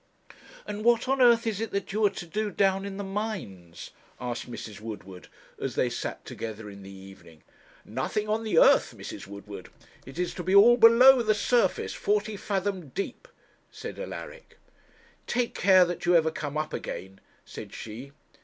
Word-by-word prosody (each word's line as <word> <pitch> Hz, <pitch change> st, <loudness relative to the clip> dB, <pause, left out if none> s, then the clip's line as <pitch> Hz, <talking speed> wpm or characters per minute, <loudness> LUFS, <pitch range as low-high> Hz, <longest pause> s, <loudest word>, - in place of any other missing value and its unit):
'And 210 Hz, +1 st, -5 dB
what 235 Hz, +1 st, +3 dB
on 270 Hz, 0 st, +1 dB
earth 235 Hz, -1 st, +5 dB
is 220 Hz, -2 st, -2 dB
it 225 Hz, -, -2 dB
that 200 Hz, -1 st, -4 dB
you 215 Hz, +1 st, 0 dB
are -, -, +1 dB
to 190 Hz, -, -8 dB
do 210 Hz, +5 st, -2 dB
down 195 Hz, -1 st, +1 dB
in 195 Hz, -1 st, -6 dB
the 200 Hz, -, -4 dB
mines?' 190 Hz, -, -6 dB, 0.3 s
asked 125 Hz, -1 st, -5 dB
Mrs. 105 Hz, -4 st, -8 dB
Woodward 95 Hz, -5 st, -9 dB, 0.3 s
as -, -, -3 dB
they -, -, +1 dB
sat -, -, -5 dB
together 110 Hz, -2 st, -7 dB
in 100 Hz, 0 st, -12 dB
the 95 Hz, -, -11 dB
evening. 95 Hz, -5 st, -14 dB, 0.4 s
'Nothing 130 Hz, -, -3 dB
on 215 Hz, +1 st, -1 dB
the 215 Hz, -7 st, -1 dB
earth, -, -, +5 dB
Mrs. -, -, -8 dB
Woodward 100 Hz, -1 st, -10 dB, 0.4 s
it 135 Hz, -, -11 dB
is 175 Hz, -1 st, -1 dB
to -, -, -6 dB
be 185 Hz, +2 st, +1 dB
all 230 Hz, +4 st, +8 dB
below 245 Hz, +2 st, +7 dB
the 215 Hz, -2 st, +2 dB
surface, 235 Hz, +3 st, +1 dB
forty 210 Hz, +1 st, -1 dB
fathom 195 Hz, -5 st, -3 dB
deep,' 195 Hz, -, -5 dB, 0.4 s
said -, -, -8 dB
Alaric. -, -, -8 dB, 0.7 s
'Take 240 Hz, -1 st, -1 dB
care 185 Hz, -1 st, +5 dB
that 175 Hz, 0 st, -5 dB
you 175 Hz, -, +5 dB
ever 160 Hz, -1 st, +4 dB
come 150 Hz, -1 st, -5 dB
up 155 Hz, 0 st, -3 dB
again,' 95 Hz, +1 st, -6 dB, 0.3 s
said -, -, -9 dB
she. 120 Hz, +5 st, -8 dB
190 Hz, 175 wpm, -27 LUFS, -, 0.7 s, all